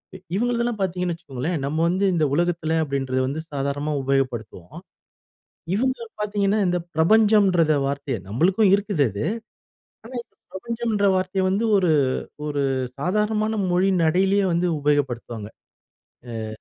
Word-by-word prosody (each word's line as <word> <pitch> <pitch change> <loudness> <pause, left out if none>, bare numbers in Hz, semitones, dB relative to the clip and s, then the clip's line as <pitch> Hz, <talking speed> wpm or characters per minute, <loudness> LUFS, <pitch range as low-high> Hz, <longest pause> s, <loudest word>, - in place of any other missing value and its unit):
இ - - -6 0.2
இவங்களுதெல்லாம் 235 0 0
பாத்தீங்கன்னு 180 -1 -1
வச்சுக்கோங்களேன் 160 -1 -4
நம்ம 145 +3 -2
வந்து 190 +3 +1
இந்த 160 -3 +2
உலகத்துல 170 0 0
அப்டின்றத 135 -3 -1
வந்து 145 +4 -3
சாதாரணமா 145 +1 -2
உபயோகப்படுத்துவோம். 120 -9 -2 1.0
இவங்க 260 +4 +1 0.2
பாத்தீங்கன்னா 205 0 +1
இந்த 180 0 +1 0.2
பிரபஞ்சம்ன்றத 190 -2 +4
வார்த்தைய 140 -2 -2
நம்மளுக்கும் 185 - +3
இருக்குது 200 -7 0
அது. 100 +2 -3 0.8
ஆனா, 240 +3 -11
இந்த - - -43 0.2
பிரபஞ்சம்ன்ற 225 0 -1
வார்த்தைய 185 +1 -1
வந்து 200 +4 0
ஒரு 185 -4 +2 0.6
ஒரு 145 -1 -1 0.4
சாதாரணமான 215 +5 0
மொழி 185 +2 +3
நடையிலயே 190 +5 +3
வந்து 170 +1 +1
உபயோகப்படுத்துவாங்க. 120 -7 -1 0.9
அ. - - -4
175 Hz, 120 wpm, -23 LUFS, 140-205 Hz, 1.0 s, பிரபஞ்சம்ன்றத